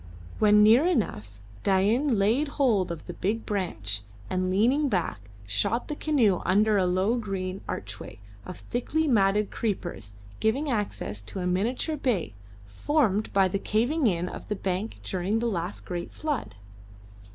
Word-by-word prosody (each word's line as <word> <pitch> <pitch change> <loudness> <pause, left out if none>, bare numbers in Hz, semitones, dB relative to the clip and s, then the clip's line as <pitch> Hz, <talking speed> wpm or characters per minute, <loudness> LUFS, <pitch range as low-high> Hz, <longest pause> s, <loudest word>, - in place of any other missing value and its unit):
When 210 0 +6
near 235 +10 +6
enough 105 - -1 0.2
Dain 215 +7 +2
laid 225 +10 +2
hold 210 - +2
of 165 -2 -7
the 175 - -6
big 210 +6 -2
branch, 110 - -2 0.3
and 185 0 0
leaning 250 +10 +3
back 110 - -2 0.2
shot 200 - -1
the 300 - -2
canoe 245 - +2
under 210 +3 +3
a 190 -2 +3
low 190 +6 +1
green 195 -4 -4
archway 100 +3 -6 0.3
of 180 - -9
thickly 310 +6 -1
matted 210 -4 +3
creepers 175 - -3 0.3
giving 270 +7 +1
access 205 - -3
to 110 - -7
a 180 - -2
miniature 230 - 0
bay 210 - -1 0.3
formed 215 - 0
by 195 -1 +4
the 195 +2 -2
caving 245 +9 +1
in 175 -3 0
of - - -8
the 210 - -1
bank 195 +3 -3
during 190 +3 -1
the 235 - -1
last 185 -4 -3
great 175 -1 -5
flood. 295 - -3
200 Hz, 150 wpm, -27 LUFS, 180-235 Hz, 0.3 s, When